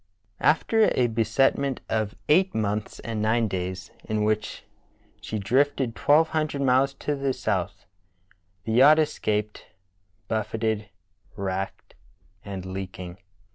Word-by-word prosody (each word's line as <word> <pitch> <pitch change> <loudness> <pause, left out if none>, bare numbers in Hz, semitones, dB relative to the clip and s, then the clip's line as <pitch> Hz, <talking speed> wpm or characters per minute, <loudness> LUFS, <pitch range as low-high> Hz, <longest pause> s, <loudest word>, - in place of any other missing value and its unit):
After 215 +9 +3
a 125 - +3
beset 115 +4 +2
ment 140 -2 -2
of 110 -2 -1
eight 185 +5 +3
months 105 -1 -2
and 115 -2 -4
nine 110 +1 +2
days, 95 -1 -4
in 110 -1 -1
which 110 0 -1 0.6
she 110 - -4
drifted 125 +3 +1
twelve 155 +3 +4
hundred 155 -3 -1
miles 135 +1 +3
to 145 +1 -2
the 135 -1 -1
south, 100 -2 -2 0.8
the 110 - -3
yacht 135 +7 +7
escaped, 105 -8 -1 0.6
buffeted, 110 -1 -2 0.5
racked, 95 -1 -4 0.5
and 95 -2 -6
leaking. 95 -1 -7
110 Hz, 120 wpm, -25 LUFS, 100-135 Hz, 0.8 s, yacht